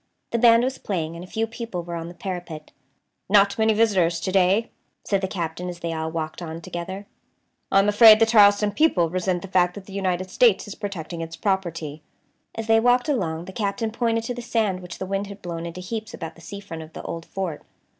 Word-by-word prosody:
The 235 - 0
band 230 0 +6
was 260 +1 -2
playing, 165 -5 -3
and 170 - -8
a - - -10
few 225 +4 -1
people 225 -6 -6
were 170 0 -7
on 165 -1 -4
the 175 - -10
parapet. 175 -5 -6 0.6
"Not 200 +1 +4
many 220 0 +4
visitors 190 -7 +2
to 185 - -2
day," 195 +4 +3 0.3
said 195 -2 0
the 190 - -1
Captain, 180 -1 -4
as 175 -1 -8
they 170 -1 -2
all 160 0 -3
walked 160 +1 -4
on 165 -1 -6
together. 180 +4 -6 0.7
"I - - +4
am 195 +1 +5
afraid 215 +1 +8
the 225 - +5
Charleston 205 -2 +5
people 200 - +2
resent 180 -1 -1
the - - -6
fact 180 -1 +2
that 200 -2 -9
the 195 - -12
United 185 -1 -2
States 230 -3 +3
is 205 - -6
protecting 175 -6 -6
its 165 0 -6
property." 165 -7 -2 0.5
As 225 - -4
they 225 0 +4
walked 245 +5 +3
along 170 - -1
the 190 - -9
Captain 220 +2 -2
pointed 230 0 0
to 245 - -3
the 245 - -6
sand 220 -5 0
which 180 -2 -9
the 190 - -4
wind 195 +1 -2
had 200 0 -9
blown 170 -1 -5
into 170 +2 -7
heaps 220 +4 -5
about 165 -2 -7
the 170 - -17
sea 200 +4 -8
front 165 -5 -8
of 160 0 -12
the - - -8
old 165 - -5
fort. 185 -5 -4
190 Hz, 225 wpm, -24 LUFS, 170-215 Hz, 0.7 s, afraid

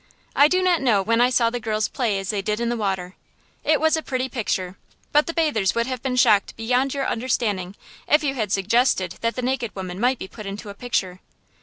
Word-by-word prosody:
I 285 - +7
do 370 +3 +1
not 360 -2 +3
know 220 -7 +3
when 230 +3 +2
I 245 - +5
saw 235 -2 +2
the 245 - -3
girls 215 -1 -1
play 235 -7 -1
as 195 +1 -2
they 205 -2 -2
did 210 +2 -2
in 235 0 -1
the 240 - 0
water. 190 -4 -3 0.5
It 310 -1 +3
was 315 +1 +3
a 320 - -2
pretty 260 -3 -2
picture, 190 -6 -2 0.4
but 295 +1 +3
the - - -1
bathers 295 - +1
would 235 0 +1
have 255 -1 -4
been 260 -1 -2
shocked 215 -5 +3
beyond 250 +4 0
your 275 -1 -1
understanding 210 -6 -1 0.3
if 300 +1 +4
you 275 -2 0
had 215 -7 -3
suggested 195 -2 +1
that 230 +1 -1
naked 255 -2 -1
women 185 -1 -6
might 250 +3 +2
be 190 - -7
put 215 +1 -10
into 200 +1 -7
a - - -7
picture. 195 -5 -2
235 Hz, 225 wpm, -23 LUFS, 200-260 Hz, 0.5 s, I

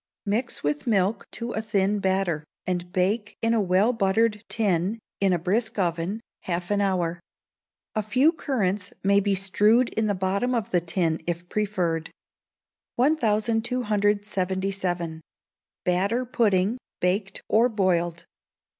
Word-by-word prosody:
Mix 230 +5 -2
with 145 +5 -1
milk 200 -1 +1
to 235 0 -4
a 220 - -2
thin 205 -1 +1
batter, 190 -5 0 0.2
and 180 -1 -2
bake 205 +3 0
in 230 0 +1
a 225 - +3
well 195 +5 +3
buttered 210 0 +1
tin, 200 -1 0 0.2
in 195 -1 +3
a 180 - +3
brisk 220 +7 -1
oven, 175 +3 -1 0.2
half 175 +1 -3
an 205 0 +2
hour. 175 -3 0 0.7
A 215 - 0
few 255 +9 +3
currants 210 - -1
may 200 +1 +5
be 200 0 +1
strewed 210 +6 +3
in 220 -1 -1
the 205 - +1
bottom 200 +7 0
of 225 -4 -2
the 175 - +3
tin 165 -1 0
if 175 0 -3
preferred. 180 -6 -1 0.9
1277. 205 - 0 0.6
Batter 200 +8 +1
Pudding, 220 -2 +1 0.2
Baked 195 +2 -1
or 230 +3 +4
Boiled. 175 -5 0
200 Hz, 130 wpm, -25 LUFS, 180-220 Hz, 0.9 s, may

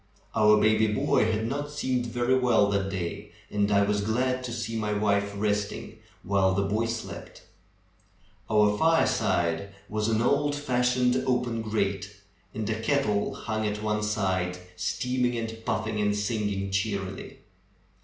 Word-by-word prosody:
Our 105 -1 +5
baby 110 +1 +4
boy 105 +1 +2
had 110 0 -1
not 145 +4 -3
seemed 130 -4 -1
very 120 +2 +1
well 120 -5 +3
that 100 -1 0
day 95 +2 -5 0.2
and 105 0 +1
I 100 0 +4
was 105 0 +1
glad 125 +4 0
to 120 - -5
see 115 -1 -4
my 105 -1 -1
wife 100 -1 +1
resting 105 0 -2 0.2
while 95 -1 +2
the 100 - +1
boy 105 +4 0
slept. 115 -1 -6 1.1
Our 105 -1 +4
fireplace 85 - +2 0.2
was 105 0 -1
an 115 0 +1
old 145 +3 +2
fashioned 125 -2 +1
open 125 -2 0
grate, 100 -3 -2 0.4
and 110 -1 -4
a 110 0 -2
kettle 110 -5 +1
hung 110 -1 -2
at 105 +1 -3
one 105 0 0
side 95 -4 -1 0.2
steaming 125 +6 -1
and 115 0 -5
puffing 110 0 -1
and 105 0 +1
singing 105 -2 -2
cheerily. 95 -1 -3
105 Hz, 145 wpm, -27 LUFS, 100-120 Hz, 1.1 s, Our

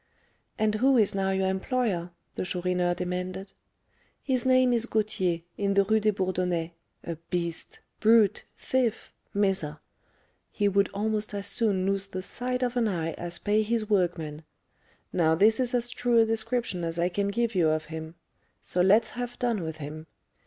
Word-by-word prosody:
"And 215 -1 +1
who 260 +5 +3
is 215 -4 +3
now 195 -1 0
your 190 0 +1
employer?" 190 -2 -1 0.2
the - - -3
Chourineur 180 -1 0
demanded. 180 +2 -4 0.7
"His 260 -2 0
name 255 -1 +4
is 235 0 0
Gauthier, 190 -7 0 0.2
in 200 -1 +1
the 200 - +5
Rue 220 +2 +2
des 215 0 +2
Bourdonnais, 180 -3 -1 0.3
a 170 -1 -5
beast 170 -1 -3 0.2
brute 220 -2 +4
thief 255 -4 -1 0.2
miser! 190 -7 0 0.7
He 205 - 0
would 200 0 +2
almost 210 +1 -2
as 200 0 -3
soon 200 -6 +1
lose 195 0 0
the 185 -1 -5
sight 250 +5 -2
of 245 0 -1
an 235 -2 +2
eye 165 -5 -2
as 175 0 -4
pay 210 +1 +1
his 215 0 -1
workmen. 165 -6 0 0.7
Now 160 -2 +3
this 215 +7 +4
is 250 -2 +2
as 240 0 0
true 245 -1 +1
a 225 - +6
description 225 -4 -1
as 165 0 -2
I 170 +1 +2
can 200 +3 -1
give 230 +3 0
you 170 -5 +3
of 155 0 0
him; 160 +1 -7 0.4
so 180 - -1
let's 210 +4 +4
have 245 0 -5
done 235 -5 0
with 160 -1 -5
him. 155 +1 -8
200 Hz, 170 wpm, -27 LUFS, 175-225 Hz, 0.7 s, a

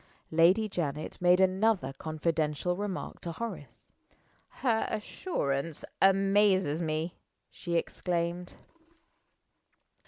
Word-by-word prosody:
Lady 175 +7 +4
Janet 155 -6 -4
made 180 +1 +5
another 190 -6 +2
confidential 155 +2 -1
remark 200 -1 -5
to 170 - -5
Horace. 230 +6 -7 0.5
"Her 230 -4 0
assurance 165 - -3 0.2
amazes 195 -4 +4
me!" 160 +1 -2 0.4
she 170 -1 -4
exclaimed. 175 +1 -2
175 Hz, 85 wpm, -30 LUFS, 160-195 Hz, 0.5 s, made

